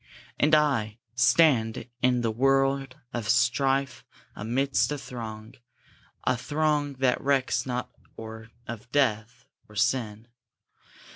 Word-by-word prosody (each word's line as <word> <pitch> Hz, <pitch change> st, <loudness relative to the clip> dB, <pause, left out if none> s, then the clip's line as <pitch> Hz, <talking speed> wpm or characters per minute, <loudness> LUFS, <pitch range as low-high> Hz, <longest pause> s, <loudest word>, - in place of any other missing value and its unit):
And 155 Hz, +1 st, +5 dB
I, 125 Hz, -8 st, +1 dB, 0.2 s
Stand 125 Hz, -2 st, +3 dB
in 125 Hz, -1 st, +3 dB
the 115 Hz, -2 st, 0 dB
world 135 Hz, +2 st, +1 dB, 0.2 s
of 115 Hz, -2 st, -3 dB
strife, 135 Hz, +2 st, +1 dB, 0.3 s
amidst 130 Hz, +7 st, 0 dB
a 145 Hz, -, -2 dB
throng, 110 Hz, -3 st, -8 dB, 0.7 s
A 130 Hz, -, +2 dB
throng 150 Hz, +2 st, 0 dB
that 130 Hz, -1 st, +1 dB
recks 135 Hz, -1 st, +1 dB
not 125 Hz, 0 st, -3 dB, 0.3 s
or 110 Hz, 0 st, -9 dB, 0.2 s
of 115 Hz, 0 st, -8 dB
death, 115 Hz, -4 st, 0 dB, 0.2 s
or 105 Hz, -, -15 dB
sin! 115 Hz, -1 st, -1 dB
125 Hz, 115 wpm, -27 LUFS, 115-135 Hz, 0.7 s, And